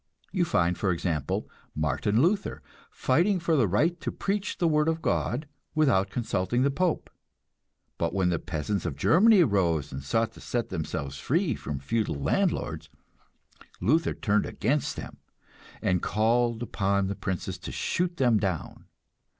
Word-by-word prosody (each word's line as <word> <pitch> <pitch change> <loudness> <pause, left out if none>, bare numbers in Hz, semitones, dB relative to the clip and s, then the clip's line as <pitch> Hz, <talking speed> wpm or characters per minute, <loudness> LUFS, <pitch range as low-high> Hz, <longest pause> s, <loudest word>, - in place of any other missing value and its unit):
You 180 -3 +1
find, 90 - +2
for 95 - +1
example, 80 -4 -2 0.3
Martin 80 - +1
Luther 195 +4 0 0.3
fighting 190 +2 +2
for 165 -1 +1
the 125 -7 +3
right 160 - +1
to - - -2
preach 200 0 -2
the 175 - +2
word 150 -1 +2
of 165 0 +1
God 150 -2 -1 0.3
without 120 -11 +3
consulting 120 +1 0
the 140 - +3
Pope; 175 +3 0 0.9
but - - 0
when 95 -2 +1
the 85 -3 0
peasants 90 +4 -2
of 75 - -3
Germany 185 - +5
rose 90 - +1
and 65 - -5
sought 115 +11 0
to - - -15
set 120 -1 -2
themselves 70 -5 -4
free 160 - +1
from 75 -8 -5
feudal 80 +7 -1
landlords, 80 - -1 0.9
Luther 155 - +2
turned 105 -1 +1
against 135 +6 -1
them, - - -8 0.7
and 90 -2 +2
called 115 +3 +1
upon 100 -3 0
the 95 - -2
princes 95 -3 -4
to - - -7
shoot 175 0 -1
them 120 -5 +3
down. 95 -6 -3
110 Hz, 150 wpm, -27 LUFS, -, 0.9 s, Germany